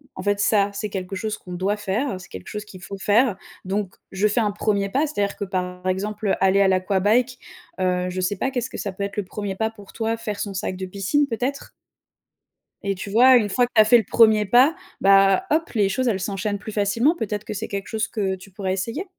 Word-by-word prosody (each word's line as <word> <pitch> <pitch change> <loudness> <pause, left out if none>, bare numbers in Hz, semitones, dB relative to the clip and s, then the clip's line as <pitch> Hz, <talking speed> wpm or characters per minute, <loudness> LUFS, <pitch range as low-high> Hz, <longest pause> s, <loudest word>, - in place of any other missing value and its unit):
en - - -6
fait, 205 0 +1
ça, 205 -1 +3
c'est 210 +1 -4
quelque 190 -1 -5
chose 215 +2 -3
qu'on 180 - -10
doit 190 +4 0
faire, 205 +2 -2
c'est 175 - -13
quelque 95 -1 -9
chose 210 0 -5
qu'il 185 -3 -13
faut 195 - -7
faire», 210 +2 +2 0.3
donc 195 0 -2 0.2
je 195 +2 +2
fais 210 +3 +1
un 210 -3 +1
premier 200 -1 0
pas. 275 +9 +1
C'est-à-dire 205 -9 -2
que, 200 - -4
par 180 -1 -4
exemple, 205 +3 -2
heu, 195 - +3
aller 190 +1 +4
à 195 - +5
l'aquabike, 205 +7 +1 0.4
heu, 180 -1 0
je 185 +1 -3
sais 185 +3 0
pas, 265 - -1
qu'est-ce 250 -1 -2
que - - -8
ça 200 - -3
peut 200 - -4
être, 200 +1 -5
le 205 - -1
1e 200 +1 -5
pas 220 +3 0
pour 205 -3 -15
toi? 225 0 -1
Faire 215 -3 -5
son 200 - -3
sac 185 0 -3
de 190 - -4
piscine, 200 +10 0
peut-être? 255 +3 -3 1.1
Et, 200 -1 -1
tu 190 +2 -7
vois? 255 +5 +7
Une 210 -3 0
fois 245 +5 +3
que - - -28
tu 220 - +8
as - - +5
fait 240 +3 +7
le 225 - +1
premier 220 -2 +5
pas, 255 +10 +5 0.3
bah, 195 - +5
hop, 320 +2 +1
les 205 -3 +3
choses, 255 +6 -1
elles 205 -5 +1
s'enchaînent 200 +2 -2
plus 215 - -8
facilement. 225 - +2
Peut-être 210 - -4
que - - -5
c'est 215 +2 -4
quelque 200 -1 -5
chose 220 0 -2
que 195 -4 -2
tu 190 +2 -14
pourrais 190 -1 -2
essayer? 230 - -3
205 Hz, 245 wpm, -23 LUFS, 190-225 Hz, 1.1 s, tu